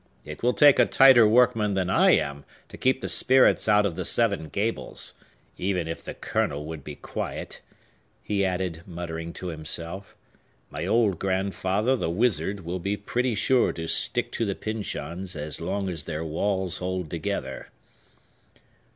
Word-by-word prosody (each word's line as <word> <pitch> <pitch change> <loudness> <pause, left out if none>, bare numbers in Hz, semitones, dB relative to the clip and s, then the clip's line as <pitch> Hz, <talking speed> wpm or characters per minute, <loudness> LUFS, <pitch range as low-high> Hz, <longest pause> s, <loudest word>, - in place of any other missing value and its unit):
It 75 - -9
will 125 +1 +1
take 145 -2 +6
a - - +5
tighter 130 -4 +7
workman 110 -3 +3
than 95 -2 0
I 95 - +4
am 70 0 -4 0.3
to - - -10
keep 130 0 +1
the - - -3
spirits 130 -3 +4
out 105 0 +5
of 90 -5 -2
the - - -3
Seven 100 -9 +1
Gables. 105 +8 -3 0.5
Even 90 -3 -1
if 80 - -5
the - - -7
Colonel 75 +1 -2
would 80 -2 -7
be 75 0 -8
quiet," - - -5 0.6
he 100 -2 0
added, 90 -3 -2
muttering 85 -2 -6
to 90 - -6
himself, 85 +4 -4 0.6
"my - - -4
old 110 -7 +2
grandfather, 95 +4 0
the 100 - -2
wizard, 100 0 0
will 90 +2 -4
be 100 +3 -2
pretty 120 +3 -1
sure 125 +4 +2
to 80 - -5
stick - - +1
to - - -2
the 100 -3 -1
Pyncheons 95 -4 -4
as 75 0 -3
long 95 +3 -2
as 85 -5 -4
their 80 +2 -4
walls 95 +3 -1
hold 90 -1 -3
together." 80 -5 -4
95 Hz, 160 wpm, -25 LUFS, 80-105 Hz, 0.6 s, tighter